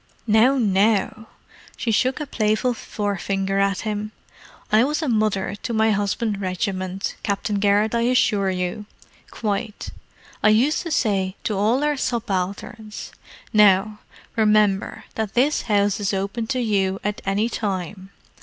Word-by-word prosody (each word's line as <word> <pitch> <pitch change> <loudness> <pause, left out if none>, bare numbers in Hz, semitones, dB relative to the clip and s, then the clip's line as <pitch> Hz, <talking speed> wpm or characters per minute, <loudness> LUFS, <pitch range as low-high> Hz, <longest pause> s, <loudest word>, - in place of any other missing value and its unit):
"Now, 230 +5 +4
now!" 215 0 +1 0.5
She 230 - -1
shook 255 +6 +1
a 300 - -3
playful 220 -1 0
forefinger 195 -3 -2
at 195 -1 +1
him. 215 0 -4 0.6
"I 220 +2 +5
was 300 +4 -1
a - - -1
mother 215 -5 0
to 235 - -3
my 220 0 +3
husband's 205 +1 -1
regiment, 185 0 -3
Captain 205 0 -1
Garrett, 205 +2 +2
I 235 - +1
assure 205 -6 +2
you. 185 +3 -3 0.4
Quite. 210 0 -4 0.5
I 215 - +5
used 245 +8 +3
to 345 - -5
say 195 - 0
to 215 - -1
all 220 +8 +2
our 295 -1 +1
subalterns, 215 -2 -3 0.4
'Now, 210 0 +4 0.4
remember 210 -3 +2
that 220 -2 -3
this 275 +5 +3
house 205 0 +2
is 200 -1 -1
open 200 +4 -3
to 255 +1 -1
you 195 -4 0
at 210 +1 -3
any 200 +3 +1
time. 190 -4 -4
210 Hz, 140 wpm, -22 LUFS, 195-225 Hz, 0.6 s, I